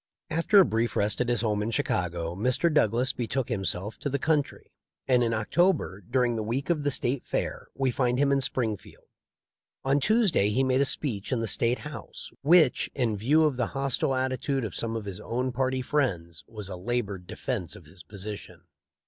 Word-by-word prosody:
After 165 +6 +3
a 190 - +7
brief 115 +2 -1
rest 105 +4 +1
at 125 - 0
his 120 - +1
home 105 -3 0
in 105 - -1
Chicago 85 -6 -1
Mr. 125 - +1
Douglas 120 -2 +2
betook 125 +1 -2
himself 95 -1 -2
to 145 - -2
the 140 - 0
country, 150 0 -1 0.4
and 125 -2 +4
in 115 - +1
Oc 110 -1 -3
tober, 175 - +2
during 120 +4 +1
the 110 - -2
week 125 +9 -1
of 160 -3 0
the 145 - +1
State 130 -1 0
Fair, - - -3
we 135 -2 +1
find 125 0 +1
him 140 +1 +3
in 140 0 +3
Springfield. 115 -6 -3 0.8
On 135 +2 +3
Tuesday 205 - +3
he 130 +6 +1
made 130 0 +2
a - - +4
speech 115 -8 -2
in 125 - +1
the 115 - -1
State 115 +3 +1
House 110 - -9
which, 155 -2 +4
in 120 -5 0
view 140 +10 +3
of 150 -5 +1
the 120 -3 0
hostile 135 0 0
attitude 130 0 -1
of 110 - -5
some 115 -1 -2
of 110 -2 -4
his 100 -3 -6
own 125 +2 -2
party 130 +1 -1
friends, 90 - -1
was 105 -4 -5
a 95 - -5
labored 100 -2 -3
defense 105 - -3
of 85 - -13
his 85 +4 -12
position. 100 -3 -7
120 Hz, 200 wpm, -27 LUFS, 105-135 Hz, 0.8 s, a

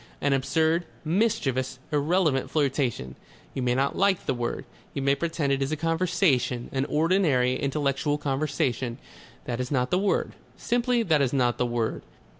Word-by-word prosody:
An 140 -1 +1
absurd, 160 +5 +1 0.2
mischievous, 135 - 0
irrelevant 150 -1 +1
flirtation. 135 - -1 0.4
You 135 - -3
may 125 -1 +1
not 135 +2 0
like 195 -2 +2
the - - +1
word. 120 -1 -3 0.3
You 140 - -2
may 140 0 +4
pretend 160 -2 -1
it 135 - -1
is 135 +2 -1
a 155 - -1
conversation, 165 -7 +1
an 135 0 0
ordinary 150 -6 +2
intellectual 140 +1 0
conversation. 135 -4 -1 0.5
That 120 -1 -3
is 125 0 -2
not 125 -3 0
the 180 - +3
word. 200 0 0 0.3
Simply 240 0 +1
that 155 -7 +2
is 135 -2 +1
not 125 -3 +1
the 125 - +2
word. 120 -2 -2
140 Hz, 160 wpm, -26 LUFS, 130-165 Hz, 0.5 s, may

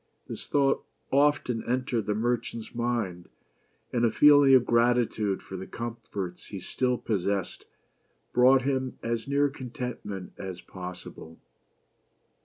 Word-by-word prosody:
This - - -7
thought 140 -1 +2 0.3
often 140 -4 +2
entered 125 -3 0
the 105 - +1
merchant's 115 0 -2
mind, 115 -7 -2 0.6
and 120 -1 +1
a 115 - +5
feeling 145 +2 +7
of 125 -2 +5
gratitude 115 -4 +2
for 95 - -8
the 95 - -7
comforts 115 -6 -6
he 100 - -6
still 125 +6 -1
possessed 100 -4 -2 0.7
brought 130 +1 +5
him 130 -1 -1
as 115 +1 -2
near 140 +1 +3
contentment 125 -7 -6
as 95 -2 -6
possible. 90 -3 -9
120 Hz, 120 wpm, -28 LUFS, 100-130 Hz, 0.7 s, feeling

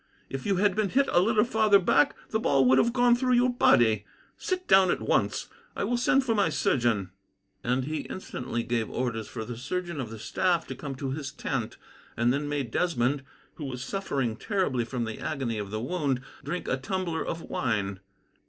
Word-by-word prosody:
"If 135 +5 -4
you 200 - +2
had 195 +1 +2
been 215 -2 +1
hit 275 +5 +3
a - - +5
little 215 +2 +3
farther 220 -3 +4
back, 200 +9 +3 0.2
the 220 - +1
ball 135 -11 +3
would 130 +1 +5
have 235 - +3
gone 245 -1 +4
through 255 +1 +1
your 245 +1 +4
body. 110 - +4 0.3
Sit 370 -2 -3
down 190 -1 +6
at - - +1
once. - - 0 0.3
I - - -2
will 245 - 0
send 260 +3 +3
for 230 - +2
my 200 -5 +2
surgeon." 120 - +1 0.5
And 125 +2 +1
he 155 +2 -4
instantly 125 -9 -4
gave 115 -2 -1
orders 120 -3 -2
for 110 -2 -6
the 120 +1 -6
surgeon 170 +5 -3
of 120 - -5
the 115 - -8
staff 170 - 0
to - - -4
come 140 -2 -6
to 130 0 -4
his 140 0 -4
tent, 135 -5 -3 0.4
and 120 +1 +3
then 145 +1 -2
made 140 -5 -2
Desmond, 140 -5 +1 0.4
who 150 - -5
was 130 -2 -5
suffering 135 - -2
terribly 145 - 0
from 120 0 -3
the 110 -1 -6
agony 130 -8 -2
of 100 -1 -5
the 110 +1 -3
wound, 135 0 -1 0.2
drink 160 +6 -4
a 135 - +1
tumbler 170 +4 -2
of 165 - -4
wine. 100 -5 -2
140 Hz, 200 wpm, -28 LUFS, 120-195 Hz, 0.5 s, down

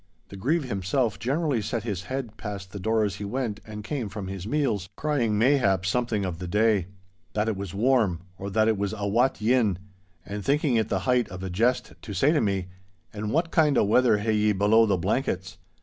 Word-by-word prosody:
The - - -9
Grieve 145 - 0
himself 115 0 -1
generally 135 +1 0
set 115 +1 -3
his 100 -6 -4
head 130 -4 -4
past 100 -3 -7
the 100 - -6
door 110 +3 +1
as 100 -3 -2
he - - -6
went 110 0 -3
and 105 -1 -7
came 125 -4 -3
from 100 -1 -6
his 95 0 -6
meals, 110 - 0
crying 125 -8 0
mayhap 105 -7 +3
something 110 0 0
of 85 -3 -4
the 90 - -5
day—that 95 -2 -1
'it 110 - 0
was 100 -1 -6
warm,' 110 -6 +2
or 100 +1 -6
that 110 +2 +2
it 110 -3 +1
was 100 +1 -1
'a 100 0 -2
wat 120 +6 +2
yin,' 110 -4 +2 0.5
and 100 +2 -5
thinking 140 0 +2
it 110 -1 +1
the 95 -3 0
height 125 -2 +2
of 90 +1 -7
a 95 - -4
jest 115 +7 +1
to 105 - -7
say 140 +8 +3
to 155 - +2
me, 100 -4 0 0.5
'An' 105 0 -4
what 165 +7 0
kind 150 -5 +3
o' - - +5
weather 110 +2 +4
hae 110 +2 -1
ye 105 0 +3
below 105 +3 +4
the 100 -2 +2
blankets? 95 -1 -2
105 Hz, 210 wpm, -26 LUFS, 95-125 Hz, 0.5 s, o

